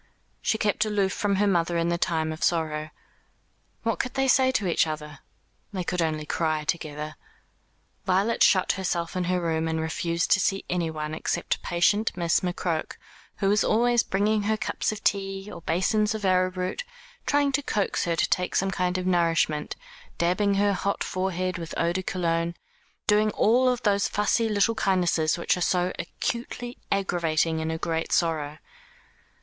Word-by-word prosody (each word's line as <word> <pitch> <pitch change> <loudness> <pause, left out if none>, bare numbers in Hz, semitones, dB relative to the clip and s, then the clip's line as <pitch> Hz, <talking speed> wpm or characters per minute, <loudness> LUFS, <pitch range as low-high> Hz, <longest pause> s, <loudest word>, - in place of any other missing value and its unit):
She 220 - +1
kept 210 0 +1
aloof 205 -3 0
from 205 -1 0
her 205 +2 +2
mother 170 -3 +1
in 170 0 +1
the 170 - +1
time 160 -2 0
of 155 - -7
sorrow. 155 -2 0 0.9
What 230 -1 -1
could 255 - -3
they 270 0 +2
say 260 0 +4
to 210 - 0
each 170 -2 +2
other? 150 -2 -6 0.5
They 185 -2 -2
could 180 0 -1
only 155 -2 -1
cry 155 -1 -1
together. 150 -1 -4 0.9
Violet 195 +5 +1
shut 185 -2 +5
herself 175 -3 -2
in 180 -1 0
her 180 +1 +1
room, 165 -1 -1
and 160 0 -1
refused 165 +1 -1
to 190 - +6
see 195 +1 0
anyone, 160 -3 -2
except 155 - -2
patient 195 +5 +1
Miss 170 -2 +2
McCroke, 175 -2 -2 0.4
who 195 - 0
was 210 +1 +3
always 240 +1 +3
bringing 210 +2 +1
her 215 +1 0
cups - - -1
of 215 - -7
tea, 195 0 -1
or 170 - -9
basins 210 +6 +1
of 210 -2 -4
arrowroot, 185 - +1 0.4
trying 285 -1 +3
to 280 +2 +1
coax 210 -7 -1
her 170 -1 0
to 175 - +2
take 180 0 0
some 195 0 +1
kind 180 -1 0
of 185 - -3
nourishment, 165 -4 +1 0.4
dabbing 195 +4 +2
her 200 0 +3
hot 200 +1 -1
forehead 185 -1 -2
with 165 -2 -6
eau 170 +1 +1
de 190 - -1
Cologne 170 -2 -1 0.5
doing 210 0 +3
all 250 +3 +3
those 205 -4 +1
fussy 220 +2 +1
little 210 +2 +2
kindnesses 180 -7 +1
which 170 - +1
are 180 - -5
so 180 0 +1
acutely 240 +6 -4
aggravating 165 -4 +1
in 160 0 -2
a 160 - -2
great 165 0 -2
sorrow. 155 -3 0
180 Hz, 170 wpm, -26 LUFS, 165-205 Hz, 0.9 s, to